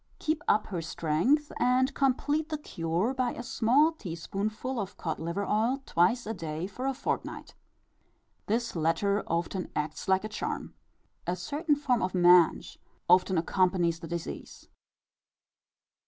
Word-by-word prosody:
Keep 310 Hz, -1 st, -1 dB
up 210 Hz, -, +3 dB
her 180 Hz, -5 st, -4 dB
strength, 170 Hz, -, +1 dB
and 250 Hz, +2 st, +3 dB
complete 290 Hz, +3 st, +1 dB
the 310 Hz, -, -2 dB
cure 175 Hz, -, -1 dB
by 255 Hz, -2 st, 0 dB
a 240 Hz, -, -6 dB
small 255 Hz, +7 st, +3 dB
tea 195 Hz, -, -7 dB
spoonful 215 Hz, +9 st, -3 dB
of 200 Hz, -1 st, -5 dB
cod 160 Hz, -2 st, -3 dB
liver 170 Hz, +5 st, -2 dB
oil 235 Hz, +7 st, +1 dB
twice 185 Hz, +9 st, +2 dB
a 220 Hz, -, -3 dB
day 165 Hz, -3 st, -4 dB
for 250 Hz, +7 st, -5 dB
a 270 Hz, -, +1 dB
fortnight. 280 Hz, -, -4 dB, 0.9 s
This 230 Hz, +1 st, -1 dB
latter 170 Hz, +6 st, +1 dB
often 170 Hz, +2 st, -2 dB
acts 150 Hz, +1 st, -3 dB
like 190 Hz, +1 st, +3 dB
a -, -, -2 dB
charm. 215 Hz, -, -4 dB, 0.5 s
A 175 Hz, -, 0 dB
certain 290 Hz, -, 0 dB
form 260 Hz, -5 st, +1 dB
of 185 Hz, 0 st, -1 dB
"mange" 175 Hz, -1 st, +4 dB, 0.3 s
often 180 Hz, +1 st, +4 dB
accompanies 175 Hz, -1 st, +1 dB
the 165 Hz, -, -8 dB
disease. 170 Hz, 0 st, -7 dB
200 Hz, 145 wpm, -29 LUFS, 170-255 Hz, 0.9 s, mange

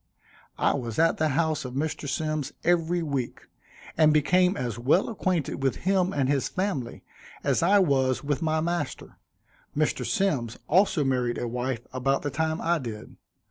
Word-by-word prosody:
I -, -, +2 dB
was 115 Hz, -3 st, -4 dB
at 165 Hz, +1 st, +3 dB
the 155 Hz, 0 st, +1 dB
house 160 Hz, -2 st, +1 dB
of 130 Hz, -1 st, -7 dB
Mr. 145 Hz, 0 st, -2 dB
Symmes 155 Hz, -1 st, -2 dB
every 175 Hz, 0 st, +2 dB
week; 140 Hz, -5 st, -3 dB, 0.5 s
and 155 Hz, -1 st, +5 dB
became 180 Hz, +5 st, +3 dB
as 120 Hz, -4 st, -3 dB
well 145 Hz, +10 st, +2 dB
acquainted 185 Hz, -, -1 dB
with 135 Hz, -3 st, +1 dB
him 190 Hz, -1 st, +2 dB
and 140 Hz, -7 st, 0 dB
his 140 Hz, -1 st, +1 dB
family, 185 Hz, -11 st, -3 dB, 0.4 s
as -, -, +1 dB
I 195 Hz, +5 st, +5 dB
was 135 Hz, -8 st, +2 dB
with 145 Hz, +1 st, -1 dB
my 160 Hz, -1 st, +1 dB
master. 170 Hz, +1 st, -3 dB, 0.6 s
Mr. -, -, +1 dB
Symmes 145 Hz, -, 0 dB
also 185 Hz, -1 st, +3 dB
married 125 Hz, -3 st, 0 dB
a 120 Hz, -, -2 dB
wife 120 Hz, 0 st, -3 dB
about 135 Hz, +2 st, 0 dB
the 145 Hz, -, -2 dB
time 160 Hz, +1 st, -1 dB
I 170 Hz, 0 st, +1 dB
did. 115 Hz, -5 st, -7 dB
150 Hz, 165 wpm, -26 LUFS, 130-170 Hz, 0.6 s, and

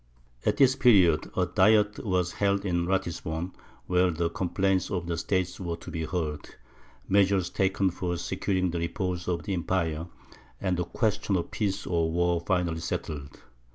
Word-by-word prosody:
At -, -, +2 dB
this 130 Hz, -2 st, +5 dB
period, 100 Hz, -, +5 dB
a -, -, +3 dB
diet 105 Hz, +1 st, +3 dB
was 90 Hz, -4 st, 0 dB
held 100 Hz, 0 st, 0 dB
in 85 Hz, -2 st, 0 dB
Ratisbon, 90 Hz, -2 st, -2 dB, 0.3 s
where 90 Hz, 0 st, +3 dB
the 85 Hz, 0 st, -1 dB
complaints 95 Hz, +1 st, 0 dB
of 90 Hz, -3 st, -2 dB
the 85 Hz, 0 st, -2 dB
States 90 Hz, +2 st, -1 dB
were 85 Hz, -3 st, -3 dB
to -, -, -10 dB
be 80 Hz, -1 st, -3 dB
heard, 80 Hz, -3 st, -4 dB, 0.5 s
measures 95 Hz, -2 st, +3 dB
taken 95 Hz, 0 st, +1 dB
for 90 Hz, 0 st, -3 dB
securing 95 Hz, +1 st, -1 dB
the 85 Hz, -, -2 dB
repose 85 Hz, +1 st, -3 dB
of 85 Hz, -2 st, -1 dB
the 100 Hz, -, -2 dB
Empire, 85 Hz, -2 st, -1 dB, 0.5 s
and 95 Hz, -2 st, 0 dB
the 90 Hz, -, -1 dB
question 105 Hz, 0 st, 0 dB
of 85 Hz, -, -2 dB
peace 100 Hz, -2 st, -2 dB
or 85 Hz, -2 st, +1 dB
war 85 Hz, 0 st, +1 dB
finally 90 Hz, -3 st, 0 dB
settled. 75 Hz, -3 st, -5 dB
90 Hz, 160 wpm, -28 LUFS, 85-95 Hz, 0.5 s, this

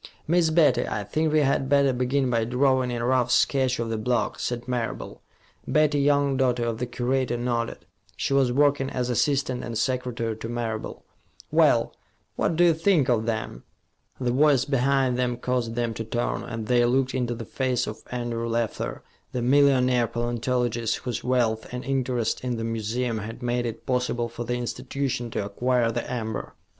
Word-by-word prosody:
"Miss 170 Hz, 0 st, +3 dB
Betty, 150 Hz, -7 st, +3 dB
I 105 Hz, -, -2 dB
think 155 Hz, +9 st, 0 dB
we 155 Hz, 0 st, +4 dB
had 135 Hz, -1 st, +1 dB
better 140 Hz, -1 st, +4 dB
begin 130 Hz, +1 st, 0 dB
by 115 Hz, -1 st, +2 dB
drawing 130 Hz, +2 st, +2 dB
a 120 Hz, -1 st, -2 dB
rough 125 Hz, -1 st, +2 dB
sketch 130 Hz, 0 st, +2 dB
of 115 Hz, -1 st, -3 dB
the 110 Hz, -, -2 dB
block," 120 Hz, +2 st, 0 dB
said 120 Hz, 0 st, -3 dB
Marable. 125 Hz, -2 st, -4 dB, 0.5 s
Betty 150 Hz, -1 st, +3 dB
Young, 140 Hz, -1 st, +2 dB
daughter 125 Hz, -2 st, +1 dB
of 115 Hz, -1 st, -2 dB
the 125 Hz, -, -2 dB
curator, 125 Hz, 0 st, -1 dB
nodded. 120 Hz, -1 st, -2 dB, 0.3 s
She -, -, -1 dB
was 135 Hz, -3 st, +3 dB
working 140 Hz, 0 st, +2 dB
as 125 Hz, -1 st, -2 dB
assistant 130 Hz, 0 st, 0 dB
and 115 Hz, -2 st, -4 dB
secretary 120 Hz, -2 st, -1 dB
to 115 Hz, +1 st, -6 dB
Marable. 115 Hz, -2 st, -4 dB, 0.5 s
"Well -, -, +3 dB, 0.4 s
what 165 Hz, -, 0 dB
do 175 Hz, -, +4 dB
you 170 Hz, -1 st, +6 dB
think 160 Hz, -4 st, +2 dB
of 115 Hz, -2 st, +1 dB
them?" 110 Hz, -, -3 dB, 0.6 s
The 125 Hz, -2 st, 0 dB
voice 135 Hz, 0 st, +4 dB
behind 135 Hz, -2 st, +1 dB
them 125 Hz, -1 st, 0 dB
caused 125 Hz, -2 st, -2 dB
them 120 Hz, -1 st, -1 dB
to 115 Hz, -, -4 dB
turn, 120 Hz, +2 st, -2 dB
and 115 Hz, -1 st, -5 dB
they 120 Hz, +1 st, +3 dB
looked 130 Hz, +2 st, +1 dB
into 120 Hz, -2 st, -1 dB
the 115 Hz, -1 st, -7 dB
face 130 Hz, 0 st, -1 dB
of 110 Hz, -, -7 dB
Andrew 120 Hz, -1 st, -3 dB
Leffler, 115 Hz, -1 st, -2 dB, 0.3 s
the 125 Hz, -, -1 dB
millionaire 130 Hz, -2 st, +4 dB
paleontologist, 120 Hz, 0 st, -1 dB
whose 125 Hz, -3 st, -3 dB
wealth 120 Hz, -3 st, 0 dB
and 125 Hz, 0 st, -5 dB
interest 130 Hz, -4 st, -1 dB
in 125 Hz, -2 st, -2 dB
the 115 Hz, -, -3 dB
museum 115 Hz, +1 st, -2 dB
had 110 Hz, +3 st, -7 dB
made 120 Hz, 0 st, 0 dB
it 115 Hz, 0 st, -7 dB
possible 125 Hz, -2 st, -1 dB
for 120 Hz, +1 st, -6 dB
the 120 Hz, +1 st, -1 dB
institution 125 Hz, 0 st, -3 dB
to 105 Hz, -, -3 dB
acquire 120 Hz, +3 st, +1 dB
the -, -, -4 dB
amber. 110 Hz, -3 st, -4 dB
125 Hz, 175 wpm, -25 LUFS, 115-130 Hz, 0.6 s, you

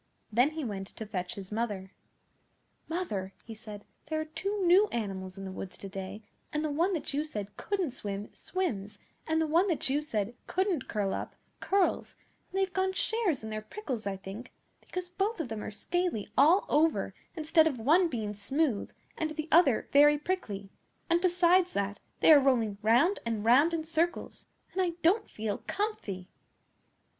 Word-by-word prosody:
Then 245 Hz, +6 st, +4 dB
he 315 Hz, -1 st, -4 dB
went 195 Hz, -4 st, -4 dB
to 220 Hz, -, -8 dB
fetch 180 Hz, -4 st, -4 dB
his 195 Hz, -1 st, -8 dB
mother. 210 Hz, -4 st, -3 dB, 1.0 s
'Mother,' 210 Hz, -, -3 dB
he 225 Hz, -, -7 dB
said, 215 Hz, -2 st, -10 dB, 0.2 s
'there 310 Hz, 0 st, -1 dB
are -, -, -4 dB
two 390 Hz, +5 st, -2 dB
new 375 Hz, +5 st, +6 dB
animals 195 Hz, -, -4 dB
in 195 Hz, -, -6 dB
the 190 Hz, -, -5 dB
woods 185 Hz, 0 st, -7 dB
to 195 Hz, -, -7 dB
day, 195 Hz, +2 st, -7 dB, 0.3 s
and 305 Hz, +1 st, -1 dB
the 305 Hz, -, -1 dB
one 340 Hz, +7 st, +1 dB
that 315 Hz, -4 st, -3 dB
you 290 Hz, +2 st, +1 dB
said 210 Hz, -9 st, -5 dB
couldn't 385 Hz, -8 st, -1 dB
swim, 205 Hz, -4 st, -5 dB
swims, 215 Hz, -, -3 dB, 0.3 s
and 320 Hz, 0 st, +2 dB
the 320 Hz, -, +2 dB
one 335 Hz, +5 st, +3 dB
that 320 Hz, -7 st, 0 dB
you 290 Hz, +2 st, +2 dB
said 225 Hz, -7 st, -2 dB
couldn't 370 Hz, -6 st, 0 dB
curl 200 Hz, -3 st, -1 dB
up, -, -, -5 dB, 0.2 s
curls; 390 Hz, -2 st, +1 dB, 0.3 s
and 385 Hz, -, -5 dB
they've 385 Hz, -1 st, 0 dB
gone 380 Hz, 0 st, +1 dB
shares 380 Hz, -, 0 dB
in 220 Hz, -, -5 dB
their 215 Hz, 0 st, -3 dB
prickles, 240 Hz, -, -5 dB
I 195 Hz, -1 st, -2 dB
think, 195 Hz, +6 st, -9 dB, 0.3 s
because 365 Hz, 0 st, -5 dB
both 390 Hz, +4 st, -1 dB
of 300 Hz, -7 st, -3 dB
them 220 Hz, -1 st, -4 dB
are -, -, -4 dB
scaly 270 Hz, -, -1 dB
all 320 Hz, +8 st, +5 dB
over, 315 Hz, +2 st, +2 dB, 0.2 s
instead 320 Hz, 0 st, +4 dB
of 280 Hz, -5 st, -1 dB
one 315 Hz, +11 st, +4 dB
being 220 Hz, -8 st, -3 dB
smooth 235 Hz, +3 st, 0 dB, 0.3 s
and 315 Hz, -, 0 dB
the 310 Hz, 0 st, -4 dB
other 315 Hz, -8 st, +5 dB
very 295 Hz, +1 st, +7 dB
prickly; 210 Hz, -, -3 dB, 0.4 s
and, 340 Hz, +1 st, +4 dB
besides 360 Hz, 0 st, +4 dB
that, 200 Hz, 0 st, -1 dB, 0.2 s
they -, -, +7 dB
are 295 Hz, -, +9 dB
rolling 230 Hz, -7 st, +2 dB
round 245 Hz, -, +4 dB
and 225 Hz, -2 st, -2 dB
round 275 Hz, +8 st, +6 dB
in 330 Hz, -1 st, -1 dB
circles, 330 Hz, +2 st, -1 dB, 0.3 s
and 375 Hz, -, +1 dB
I 350 Hz, -2 st, +1 dB
don't 410 Hz, +6 st, +3 dB
feel 215 Hz, -2 st, -3 dB
comfy. 215 Hz, -, -3 dB
285 Hz, 180 wpm, -30 LUFS, 210-345 Hz, 1.0 s, are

